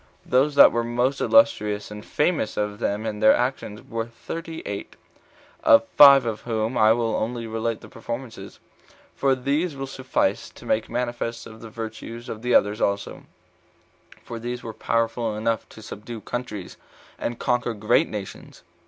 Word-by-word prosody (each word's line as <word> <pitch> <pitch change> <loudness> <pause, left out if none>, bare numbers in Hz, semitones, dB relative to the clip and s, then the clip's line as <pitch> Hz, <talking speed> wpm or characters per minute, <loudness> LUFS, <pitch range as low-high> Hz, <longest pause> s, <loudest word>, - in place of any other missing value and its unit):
Those 140 +3 +2
that - - +9
were 120 0 0
most 120 +3 0
illustrious 105 - +3
and 105 0 -8
famous 150 -7 0
of 105 0 -2
them 105 -2 -1
for 110 - -1
their 110 +1 +5
actions 120 -4 -3
were 115 0 -3
thirty 165 +7 -7
eight; 100 -1 -6 0.7
of 115 0 +6
five 140 -3 +9
of 110 -2 -3
whom 115 0 -2
I 110 0 +5
will 115 -1 +1
only 115 +1 -2
relate 115 0 -3
the - - -12
performances, 115 +1 -7 0.6
for 135 -1 +2
these 140 +5 -1
will 135 0 -4
suffice 130 -1 -1
to - - -15
make 110 - 0
manifest 120 -1 -3
the 115 0 -11
virtues 115 +2 -7
of 110 - -6
the 125 +1 +1
others 105 +2 +3
also; 100 0 -2 1.0
for 115 - -7
these 120 +1 -5
were 115 - -6
powerful 115 0 -1
enough 110 +1 -1
to 110 - -13
subdue 110 +2 -8
countries, 105 -7 -6 0.4
and 120 - -3
conquer 125 -2 0
great 105 +1 +2
nations. 105 -3 -8
115 Hz, 160 wpm, -24 LUFS, 110-125 Hz, 1.0 s, that